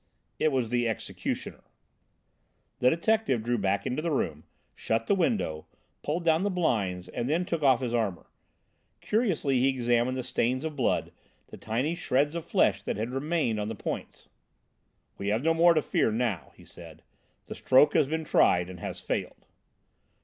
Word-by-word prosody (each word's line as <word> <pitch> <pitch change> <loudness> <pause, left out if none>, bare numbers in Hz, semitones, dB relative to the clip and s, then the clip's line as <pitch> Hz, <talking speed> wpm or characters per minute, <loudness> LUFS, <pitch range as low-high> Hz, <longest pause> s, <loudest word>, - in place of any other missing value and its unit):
"It 155 - +2
was 130 -4 0
the 120 0 +1
'executioner.'" 115 - -4 1.2
The 125 - +5
detective 170 - +1
drew 120 0 0
back 100 0 0
into 130 +5 -2
the 170 - -1
room, 80 - -2 0.3
shut 115 0 -1
the - - +2
window, 170 - -1 0.3
pulled 165 +4 -3
down 160 0 +3
the 205 - +1
blinds, 100 - -1
and 120 +1 -4
then 170 +4 +1
took 170 -2 -2
off 135 -3 +4
his 120 -2 -2
armour. 105 -7 -1 0.7
Curiously 180 - +1
he 130 - +3
examined 120 0 +1
the 130 - -3
stains 130 +3 -1
of 155 -2 -4
blood, 130 - 0 0.4
the - - -9
tiny 125 +9 -1
shreds 145 -2 0
of 170 - -4
flesh - - +2
that - - -3
had 110 +3 -3
remained 135 -4 -1
on 105 - -2
the 110 - -4
points. - - -6 0.9
"We 100 - -4
have 110 +5 0
no 165 +1 +3
more 170 +1 +5
to 155 - +2
fear - - +1
now," 110 -6 -2
he - - -17
said, - - -13 0.4
"the - - -7
stroke 145 +3 +4
has 140 - +3
been 160 +2 -2
tried 90 - +3
and 90 - -10
has - - -6
failed." - - -4
130 Hz, 175 wpm, -28 LUFS, 115-160 Hz, 1.2 s, The